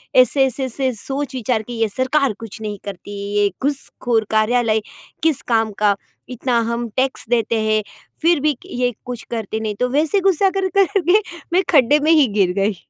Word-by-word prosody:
ऐसे-ऐसे-ऐसे 260 0 +2
सोच 275 -1 -3
विचार 240 -2 0
की 240 - -8
ये 225 - +2
सरकार 260 +3 +1
कुछ 225 0 -9
नहीं 210 -1 -4
करती, 200 0 -8 0.3
ये 205 - +3
घुसखोर 245 -5 -1
कार्यालय 220 0 +2 0.4
किस 320 -4 +2
काम 225 -2 +1
का, 205 -1 +3 0.3
इतना 250 -1 0
हम 235 0 -2
टैक्स 260 +1 0
देते 230 -1 +1
हैं, 215 0 +2 0.4
फिर 335 -1 +4
भी 300 +1 +2
कि - - -16
ये 245 0 +1
कुछ 245 -2 -6
करते 220 -2 -3
नहीं 215 -1 -3
तो 250 - +2
वैसे 300 +8 +2
गुस्सा 385 0 +3
कर 380 - +1
कर 395 +1 +3
के 355 +5 +4 0.3
मैं 370 +2 +4
खड्डे 290 -1 +5
में 320 - +5
ही 305 -5 +5
गिर 185 -2 +4
गई। 200 +2 0
245 Hz, 180 wpm, -20 LUFS, 220-290 Hz, 0.4 s, खड्डे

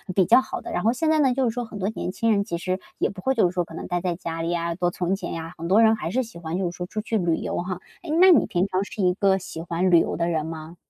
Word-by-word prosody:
比 190 - +4
较 235 +8 +6
好 - - -6
的。 - - -7
然 175 - -2
后 230 - +3
现 315 +5 0
在 315 -1 +3
呢， 265 -3 +4
就 255 -1 +1
是 225 - -4
说 245 0 -3
很 215 -2 -9
多 195 +2 0
年 215 - -4
轻 230 +4 0
人 200 -2 +2
其 170 - -3
实 185 +2 -2 0.2
也 - - +1
不 190 -2 -9
会 265 - +1
就 220 - +4
是 175 - -9
说 175 -1 0
可 165 - -13
能 - - -6
待 175 -1 -1
在 175 -1 -2
家 165 -1 -5
里 165 - -2
呀， 170 -1 -1
多 175 0 +1
存 180 +1 -1
钱 180 - -5
呀， 165 +1 -6
很 165 +1 -5
多 200 +5 +5
人 225 0 +5
还 190 - -4
是 255 +4 +1
喜 225 -7 -12
欢 165 +1 -4
就 180 -2 -1
是 - - -13
说 180 - -3
出 215 - -4
去 225 0 -1
旅 170 -4 +1
游 - - -3
哈。 180 0 -3 0.2
哎， 340 - -8
那 375 +1 +8
你 290 - +5
平 180 +1 +1
常 185 0 0
是 205 - -6
一 180 0 +4
个 195 0 +2
喜 175 -3 -7
欢 170 +2 0
旅 170 - +7
游 - - -1
的 170 0 0
人 160 -2 -1
吗？ 160 +1 -7
185 Hz, 365 characters per minute, -24 LUFS, 170-220 Hz, 0.2 s, 那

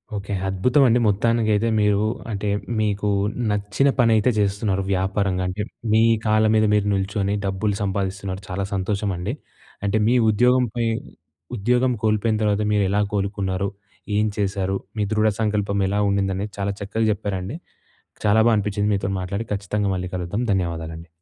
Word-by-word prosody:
Okay, 100 0 -4
అద్భుతం 125 +10 +3
అండి 120 +1 +4
మొత్తానికైతే 110 +1 +2
మీరు. 105 -1 +3 0.3
అంటే 105 0 -3 0.3
మీకు 105 -1 0 0.4
నచ్చిన 105 +7 +1
పని 115 -2 +5
అయితే 110 +3 +3
చేస్తున్నారు 100 -1 0
వ్యాపారంగా 95 0 0
అంటే, 95 +3 -3 0.3
మీ 110 - +5 0.2
కాళ్ళ 110 0 +3
మీద 110 0 +4
మీరు 105 -1 +2
నిల్చొని 100 +1 -1
డబ్బులు 100 +2 -1
సంపాదిస్తున్నారు, 95 -1 -3
చాలా 95 +2 -2
సంతోషం 100 +1 -1
అండి. 95 +6 -3 0.5
అంటే 100 +2 +1
మీ 120 - +3
ఉద్యోగం 125 +4 +4
పై 120 -1 0 0.7
ఉద్యోగం 125 +4 +2
కోల్పోయిన 110 0 +2
తర్వాత 105 0 +1
మీరు 105 -1 +3
ఎలా 105 +2 +2
కోలుకున్నారు? 100 -1 -1 0.5
ఏం 105 - +3
చేశారు, 95 -1 -1 0.2
మీ 105 - +1
దృఢ 110 0 +3
సంకల్పం 105 -2 0
ఎలా 100 +2 0
ఉండింది? 100 -1 +1
అనేది 100 +1 -4
చాలా 100 0 0
చక్కగా 105 +2 -1
చెప్పారండి 100 +2 -3 0.7
చాలా 105 +1 +4
బాగా 115 - +5
అనిపించింది 105 0 0
మీతో 95 -1 -1
మాట్లాడి. 100 +4 -3
ఖచ్చితంగా 100 0 -1
మళ్ళీ 90 0 -4
కలుద్దాం, 90 +5 -2
ధన్యవాదాలండి. 85 -3 -3
100 Hz, 150 wpm, -22 LUFS, 95-110 Hz, 0.7 s, పని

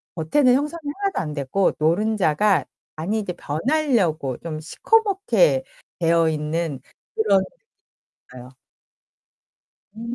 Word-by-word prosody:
겉에는 250 - +3
형성이 300 +4 -2 0.2
하나도 395 -1 -1
안되고 150 +4 -1
노른자가 185 -1 +2 0.3
안이 195 +8 -2
이제 200 -4 -4
변하려고 175 - 0
좀 155 -2 -6
시커멓게 445 - +2 0.4
되어있는 160 -3 0 0.3
그런 200 -3 +3 0.9
상태였어요. 125 +1 -12 1.4
음 235 +2 -5
180 Hz, 245 characters per minute, -22 LUFS, 155-250 Hz, 1.4 s, 겉에는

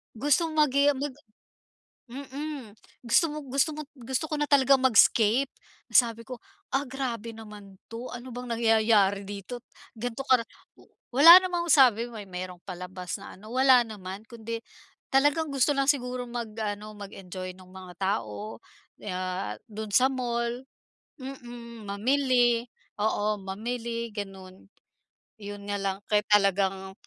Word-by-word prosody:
gustong 295 +6 +1
magi 285 -2 +4
ah, - - -4
mag 285 +1 -3 1.0
mm. 275 -3 -6 0.3
Gusto 235 +8 +4
mo 305 - -5
gusto 275 +4 +2
mo 305 - -4
gusto 260 +5 -3
ko - - -1
na 295 - 0
talagang 275 -1 +5
mag-escape, 235 +1 +5 0.4
na - - -16
sabi 230 -2 +3
ko, 250 -2 -7 0.3
"Ah, 275 +1 +2
grabe 240 -4 -4
naman 210 -3 -12
'to, 230 +3 -7
ano 245 +1 -8
bang 250 0 -6
nangyayari 220 -3 +3
dito’t, 205 +5 -7 0.3
ganito 245 +2 -4
kara" 250 -3 +4 0.3
W - - -18 0.3
wala 335 +8 +10
namang 350 -2 -2
sabi, 245 -6 +6
may 210 -3 -8
may 180 0 -5
merong 180 -1 -13
palabas 180 0 -6
na - - -10
ano, 215 +2 -13
wala 260 -1 +6
naman 195 -2 -8
kundi 230 -1 -6 0.5
talagang 290 +3 +3
gusto 275 +2 +3
lang 275 0 +1
siguro 250 -3 -2
mag 235 -2 -5
ano, 210 0 -4
mag-enjoy 185 -2 -8
no'ng 185 -1 -16
mga 185 -1 -11
tao, 110 - -3 0.5
ah, 185 - -3 0.2
do'n 215 0 -5
sa 260 +1 +6
mall 240 0 -2 0.6
mm, 240 -4 -9
mamili 245 +2 +2 0.4
oo, 210 -1 0
mamili, 230 +3 -4
gano'n. 190 -2 -8 0.8
'Yon 205 0 -7
nga 205 - -1
lang, 195 -1 -1
kaya 210 -1 +2
talagang 195 -2 +2
230 Hz, 140 wpm, -27 LUFS, 200-260 Hz, 1.0 s, wala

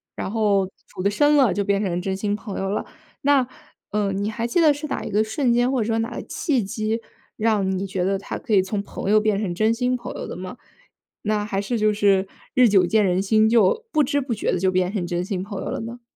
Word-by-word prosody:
然 - - -4
后 205 -3 +2 0.2
处 - - -8
得 200 - +2
深 290 +8 +3
了 245 -10 +4
就 200 +1 0
变 200 0 +1
成 180 -3 -1
真 190 0 -2
心 205 +1 -1
朋 210 -2 -6
友 195 0 -2
了。 205 - -2 0.4
那， 275 -3 +3 0.4
呃， 205 -1 0
你 200 +2 -2
还 230 +2 -3
记 240 +9 +1
得 310 -3 +6
是 295 +2 -6
哪 - - -3
一 - - -5
个 210 +2 +3
瞬 235 +3 0
间 245 +2 +2
或 255 -4 +1
者 215 - -1
说 225 0 +1
哪 230 +2 -2
个 - - -4
契 275 -7 -1
机 215 +2 -2 0.4
让 215 -3 +1
你 195 - -2
觉 185 -1 -2
得 195 +1 +1
她 - - -5
可 - - -8
以 195 - +6
从 200 +2 -3
朋 200 - -5
友 215 0 +5
变 215 -2 +1
成 185 -5 -2
真 220 +3 +2
心 250 +1 0
朋 245 - -6
友 - - -5
的 - - -6
吗？ 185 +7 -7 0.7
那 210 -1 0
还 195 -2 -2
是 230 +4 -2
就 215 0 +3
是， 200 -2 +2 0.3
日 250 -2 +6
久 195 -3 +4
见 215 +1 +3
人 185 +1 +2
心， 215 +2 +3
就， 230 - +3
不 305 -1 +3
知 285 +2 +1
不 260 -3 -2
觉 215 - -1
地 180 - 0
就 190 0 +2
变 185 0 +1
成 195 -5 -2
真 175 0 -1
心 190 -1 -3
朋 200 -1 -6
友 - - -5
了 - - -3
呢？ 235 +2 -7
210 Hz, 280 characters per minute, -23 LUFS, 195-235 Hz, 0.7 s, 得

